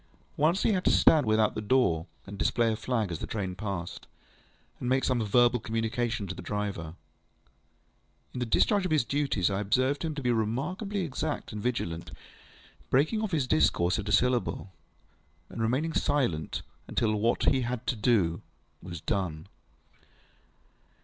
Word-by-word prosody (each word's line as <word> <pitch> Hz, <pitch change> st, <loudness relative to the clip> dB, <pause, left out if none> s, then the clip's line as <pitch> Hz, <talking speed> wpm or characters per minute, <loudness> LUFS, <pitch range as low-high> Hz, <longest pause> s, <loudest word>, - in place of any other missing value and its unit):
Once 165 Hz, +6 st, +2 dB
he -, -, +3 dB
had 185 Hz, -3 st, 0 dB
to -, -, +3 dB
stand 150 Hz, -7 st, +5 dB
without 110 Hz, 0 st, +3 dB
the -, -, -4 dB
door, 105 Hz, -8 st, +2 dB, 0.2 s
and 100 Hz, 0 st, -9 dB
display 115 Hz, +1 st, +2 dB
a -, -, -1 dB
flag 110 Hz, -3 st, -1 dB
as 85 Hz, -, -5 dB
a -, -, -4 dB
train 95 Hz, -4 st, -3 dB
passed, 95 Hz, -3 st, -5 dB, 0.7 s
and 125 Hz, -, -2 dB
make 130 Hz, +1 st, +2 dB
some 125 Hz, -3 st, +1 dB
verbal 120 Hz, +3 st, +4 dB
communication 115 Hz, 0 st, -2 dB
to 95 Hz, -, -5 dB
the -, -, -9 dB
driver. 100 Hz, -6 st, -4 dB, 1.4 s
In -, -, -4 dB
the 125 Hz, -, -2 dB
discharge 200 Hz, -, +3 dB
of 185 Hz, -, -1 dB
his 155 Hz, -5 st, +3 dB
duties, 140 Hz, -11 st, 0 dB
I 95 Hz, -, -1 dB
observed 130 Hz, -, +1 dB
him 160 Hz, -2 st, -2 dB
to 140 Hz, -, -5 dB
be 125 Hz, -, +2 dB
remarkably 150 Hz, -, -1 dB
exact 155 Hz, -1 st, -3 dB
and 105 Hz, -, -5 dB
vigilant, 85 Hz, -9 st, -2 dB, 0.8 s
breaking 155 Hz, -, +2 dB
off 215 Hz, -, -1 dB
his 155 Hz, -7 st, 0 dB
discourse 85 Hz, -1 st, +2 dB
at 105 Hz, 0 st, -4 dB
a -, -, -1 dB
syllable, 120 Hz, -3 st, +1 dB, 0.8 s
and 115 Hz, -, -6 dB
remaining 130 Hz, +9 st, 0 dB
silent 125 Hz, -, 0 dB, 0.2 s
until 110 Hz, -3 st, 0 dB
what 115 Hz, +3 st, +2 dB
he 135 Hz, -2 st, +2 dB
had 120 Hz, -1 st, -3 dB
to 125 Hz, -, 0 dB
do 105 Hz, -7 st, +2 dB, 0.4 s
was 85 Hz, -2 st, -7 dB
done. 90 Hz, -6 st, -2 dB
115 Hz, 165 wpm, -29 LUFS, 100-135 Hz, 1.4 s, stand